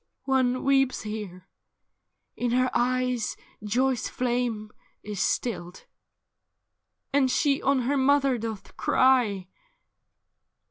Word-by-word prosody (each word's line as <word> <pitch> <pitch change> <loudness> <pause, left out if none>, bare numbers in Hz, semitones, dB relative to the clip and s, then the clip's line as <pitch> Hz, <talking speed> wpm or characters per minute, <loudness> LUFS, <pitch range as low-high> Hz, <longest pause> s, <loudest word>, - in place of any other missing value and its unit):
'' - - -55
' - - -55
One 255 -1 +1
weeps 270 -1 +2
here: 205 -4 -7 0.9
in 245 - -1
her 255 0 +2
eyes 250 -1 0 0.3
joy's 245 +3 0
flame 240 -4 -2 0.3
is 205 -2 -6
stilled. 180 -7 -2 1.3
And 275 -2 +3
she 280 +1 +1
on 270 -1 +2
her 280 +4 0
mother 275 -2 +3
doth 220 -2 -6
cry.' 235 -8 +2
250 Hz, 105 wpm, -26 LUFS, 215-265 Hz, 1.3 s, And